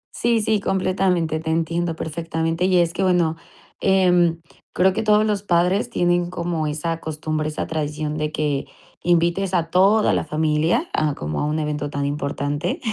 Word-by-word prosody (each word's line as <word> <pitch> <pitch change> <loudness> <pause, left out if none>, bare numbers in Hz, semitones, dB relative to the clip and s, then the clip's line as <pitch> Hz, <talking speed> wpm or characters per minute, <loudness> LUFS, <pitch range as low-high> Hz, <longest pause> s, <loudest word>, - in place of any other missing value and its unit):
Sí, 235 -1 +1
sí, 215 -1 +1
completamente, 185 -4 0
te 160 0 -5
entiendo 165 +1 -1
perfectamente. 165 +1 -2
Y 185 -1 +3
es 170 -1 +2
que 195 - -3
bueno, 175 -4 +2 0.5
em, 180 -3 +3 0.3
creo 185 +1 +3
que - - -1
todos 215 0 +3
los 210 -2 0
padres 185 +4 +1
tienen 175 -3 +1
como 170 -3 -2
esa 165 +2 -3
costumbre, 155 0 -3
esa 150 - -3
tradición 150 -1 -3
de 150 0 -1
que 145 -3 -1 0.4
invites 175 +2 +1
a 165 -1 0
toda 200 +4 +4
la - - 0
familia 160 - 0
a 155 -2 0
como 75 +1 -4
a - - 0
un 150 +1 -1
evento 150 -1 -2
tan 145 0 -3
importante. 145 +3 -2
165 Hz, 165 wpm, -22 LUFS, 155-185 Hz, 0.5 s, toda